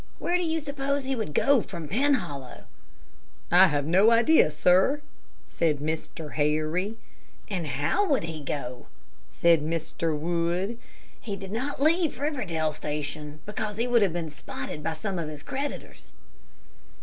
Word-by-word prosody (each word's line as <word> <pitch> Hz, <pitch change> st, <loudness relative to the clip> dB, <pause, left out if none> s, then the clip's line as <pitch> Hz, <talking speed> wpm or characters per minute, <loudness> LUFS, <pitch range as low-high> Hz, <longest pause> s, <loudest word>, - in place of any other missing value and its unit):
Where 350 Hz, -, -1 dB
do 360 Hz, -, +1 dB
you 325 Hz, -1 st, 0 dB
suppose 280 Hz, -1 st, -2 dB
he 265 Hz, 0 st, -1 dB
would 220 Hz, -9 st, -3 dB
go 275 Hz, -4 st, +4 dB
from 170 Hz, -7 st, -7 dB
Penhollow?" 190 Hz, -, -1 dB, 0.9 s
"I 185 Hz, +2 st, +9 dB
have 145 Hz, -4 st, 0 dB
no 190 Hz, +7 st, +5 dB
idea, 235 Hz, -, +5 dB
sir," 180 Hz, -, +3 dB, 0.5 s
said 160 Hz, -3 st, +1 dB
Mr. 155 Hz, +1 st, -4 dB
Harry. 155 Hz, +8 st, 0 dB, 0.5 s
"And 175 Hz, -5 st, -2 dB
how 145 Hz, -, +1 dB
would 275 Hz, -, +2 dB
he 160 Hz, -2 st, -5 dB
go?" 125 Hz, -3 st, -5 dB, 0.4 s
said 170 Hz, -2 st, +4 dB
Mr. 160 Hz, 0 st, -2 dB
Wood. 175 Hz, +7 st, -1 dB, 0.4 s
"He 205 Hz, -3 st, -5 dB
did 195 Hz, -1 st, -8 dB
not 265 Hz, +5 st, -2 dB
leave 320 Hz, -4 st, +2 dB
Riverdale 195 Hz, -, -1 dB
Station, 150 Hz, 0 st, -5 dB
because 210 Hz, 0 st, -4 dB
he 230 Hz, -, +1 dB
would 245 Hz, -2 st, +3 dB
have 195 Hz, -4 st, +3 dB
been 165 Hz, -3 st, -3 dB
spotted 145 Hz, +1 st, -6 dB
by 160 Hz, +2 st, -2 dB
some 185 Hz, +3 st, -3 dB
of 160 Hz, -2 st, -3 dB
his 150 Hz, -1 st, -8 dB
creditors." 280 Hz, +2 st, -6 dB
175 Hz, 150 wpm, -27 LUFS, 155-245 Hz, 0.9 s, I